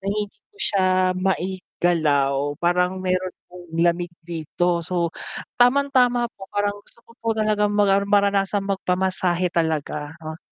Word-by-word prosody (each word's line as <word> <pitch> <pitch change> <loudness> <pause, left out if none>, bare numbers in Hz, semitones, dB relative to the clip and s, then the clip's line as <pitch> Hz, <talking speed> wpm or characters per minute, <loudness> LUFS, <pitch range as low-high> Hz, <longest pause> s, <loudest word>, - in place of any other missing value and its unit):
na 195 - -10
hindi 205 0 -3
ko 415 - -30
siya 200 - +1 0.3
maigalaw, 160 -7 0
parang 180 +3 +1
mayro'n 185 0 0
akong 180 0 -13 0.2
lamig 175 0 +1
dito. 170 +1 -1
So 170 -1 -1 0.5
tamang-tama 245 -2 +3
po 195 -1 -12
parang 205 0 -1
gusto 235 - -20
ko 230 - -18
po 230 - -11
talagang 210 -1 +1
magar 200 -1 +3
maranasang 200 0 +2
magpamasahe 185 -2 0
talaga, 155 -2 -1
oh. 155 +1 -6
185 Hz, 130 wpm, -23 LUFS, 170-205 Hz, 0.5 s, tamang-tama